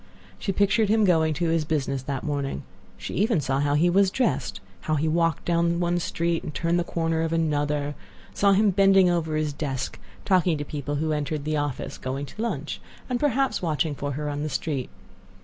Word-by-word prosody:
She 195 - -1
pictured 200 +2 +2
him 220 0 +4
going 160 -4 +3
to 170 +2 0
his 165 -1 +2
business 140 -3 -1
that 135 0 -4
morning. 140 - -2 0.3
She - - -6
even 210 -2 +2
saw 135 -1 0
how 145 0 +2
he 160 +4 +4
was 190 +2 +4
dressed; 250 +6 -1 0.2
how 155 - 0
he 155 +2 0
walked 165 +1 +1
down 170 0 +2
one 175 0 +1
street, 170 0 -1
and - - -6
turned 170 +3 0
the - - +1
corner 165 -1 -1
of 165 0 -1
another; 145 -3 0 0.4
saw 200 -1 +4
him 205 +1 +4
bending 195 -1 +5
over 160 -3 0
his 155 -1 0
desk, 135 -3 -4 0.3
talking 180 -4 +3
to 145 - -4
people 145 0 -4
who 155 +2 -1
entered 150 0 -2
the 155 0 0
office, 145 -3 -3
going 135 +2 -3
to - - -12
his - - -3
lunch, 235 - -3 0.3
and 245 - +1
perhaps 270 -5 +1
watching 155 -3 0
for 145 0 -4
her 150 +2 -3
on 145 0 -3
the 155 - -2
street. 140 -2 -2
160 Hz, 205 wpm, -25 LUFS, 145-175 Hz, 0.4 s, bending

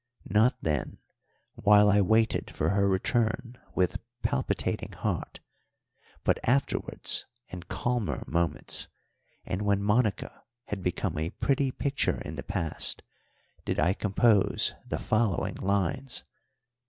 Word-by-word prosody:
Not 110 +7 +4
then, 75 -4 -1 0.6
while 105 0 +5
I 105 0 +5
waited 110 +4 +2
for - - -1
her 100 0 +2
return 115 +5 0 0.2
with 90 -1 +1 0.2
palpitating 65 - -1
heart, - - -3 0.8
but - - +2
afterwards 135 +4 0 0.2
in 90 - -7
calmer 120 +4 -2
moments, 85 0 -1 0.6
and 90 - -2
when 100 -1 +1
Monica 105 0 +1 0.2
had 100 -2 -4
become 90 -4 -1
a 80 +2 -1
pretty 140 - +1
picture 140 +2 0
in - - -6
the - - -4
past, 80 -2 -1 0.6
did - - -1
I 85 +5 +3
compose 105 0 +3
the - - -2
following 110 -4 0
lines. 125 +7 0
105 Hz, 115 wpm, -28 LUFS, 95-120 Hz, 0.8 s, while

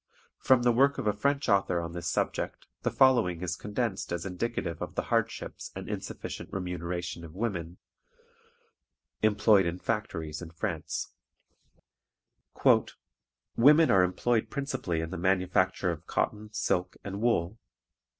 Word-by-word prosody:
From 130 -2 +4
the 120 - +5
work 135 +4 +3
of 135 - -3
a 105 - +2
French 140 +7 0
author 100 -4 +2
on 85 0 -4
this 85 -1 -4
subject - - -2 0.2
the - - 0
following 115 -10 +3
is 90 -1 -1
condensed 105 0 -3
as 85 0 -3
indicative 90 -3 -3
of - - -5
the - - 0
hardships - - -2
and - - -6
insufficient - - -6
remuneration 90 -2 -4
of 80 0 -10
women 90 -5 -3 1.4
employed 105 -3 +4
in 85 +1 -2
factories 85 -8 -3
in 85 - -7
France: 80 0 -4 2.4
"Women 150 +6 +6
are 95 - +6
employed 110 +6 +1
principally 135 - -2
in 80 0 -5
the 95 - -4
manufacture 95 0 +2
of 80 0 -8
cotton, 105 0 -1
silk, 90 -4 -1
and 100 +1 -5
wool. 110 -3 +1
95 Hz, 135 wpm, -29 LUFS, 85-115 Hz, 2.4 s, Women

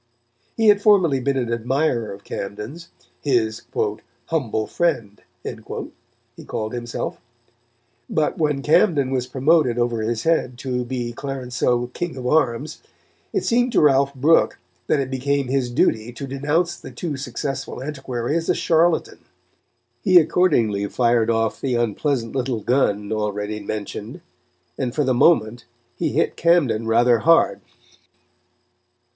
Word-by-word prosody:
He 225 -1 +4
had 205 -1 +5
formerly 185 -10 +4
been 135 +1 0
an 120 -2 -1
admirer 120 0 0
of 100 0 -10
Camden's, 105 +15 -7 0.3
his 115 -5 0 0.6
"humble 120 -9 -1
friend," 115 -13 -1 0.2
he - - -9
called 110 +1 -4
himself; 120 -1 -5 0.9
but 155 -1 0
when 150 -3 0
Camden 150 -4 +3
was 125 -2 -1
promoted 130 -1 +2
over 120 -2 0
his 110 +1 -2
head 145 -7 +1
to 125 -1 -2
be 120 -1 -4
Clarenceux 125 -2 -2
King 175 -5 -4
of 125 - -6
Arms, 135 +1 0 0.5
it 390 - -1
seemed 245 +1 +2
to - - +4
Ralph 140 -1 +3
Brooke 150 +5 +3 0.3
that 150 - +2
it 135 -1 -2
became 135 0 -1
his 130 -2 0
duty 110 -1 +1
to 140 - -6
denounce 150 +6 0
the - - -10
too 160 -5 -4
successful 135 0 -5
antiquary 135 -2 -3
as 165 0 -1
a - - +3
charlatan. 165 0 +1 0.8
He 185 +5 +5
accordingly 135 - +3
fired 115 0 +2
off 115 -1 0
the 130 -3 0
unpleasant 120 +2 -1
little 125 -4 -1
gun 105 -4 +1
already 105 0 -2
mentioned, 105 0 -6 0.6
and, 125 -2 -2
for 150 - +2
the 130 -1 +1
moment, 120 -4 +3 0.3
he - - -1
hit 160 - +1
Camden 145 -10 +2
rather 120 +1 +4
hard. 125 -11 +3
130 Hz, 135 wpm, -22 LUFS, 115-150 Hz, 0.9 s, had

